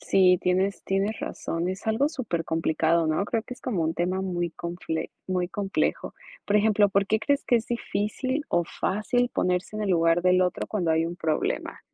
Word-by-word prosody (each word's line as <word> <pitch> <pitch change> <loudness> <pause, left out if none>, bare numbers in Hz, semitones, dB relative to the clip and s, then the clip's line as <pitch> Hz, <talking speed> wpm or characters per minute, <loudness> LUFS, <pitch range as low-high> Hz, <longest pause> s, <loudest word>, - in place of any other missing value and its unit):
Sí, 185 -2 +4
tienes 185 +2 0
tienes 195 +3 0
razón, 170 +2 -3
es 185 +1 -5
algo 225 +6 +2
supercomplicado, 165 - 0
¿no? 155 +5 +1
Creo 225 +2 -1
que 250 - -9
es - - -20
como 210 -10 -1
un 160 +1 0
tema 185 +2 0
muy 175 -2 -2
confle 170 -1 -4 0.2
muy 180 -1 -1
complejo. 195 0 -1 0.3
Por 205 - 0
ejemplo, 210 -1 +4
¿por 200 0 +1
qué 220 - +2
crees 275 +6 0
que 240 - +3
es 230 - -2
difícil 240 +4 -2
o 175 0 +2
fácil 225 +8 0
ponerse 180 +3 0
en 215 - -2
el 205 - 0
lugar 165 0 +3
del 185 0 +4
otro 180 -1 0
cuando 180 -6 0
hay 160 +1 +2
un 170 +1 -4
problema? 160 -3 -2
185 Hz, 190 wpm, -26 LUFS, 170-215 Hz, 0.3 s, Sí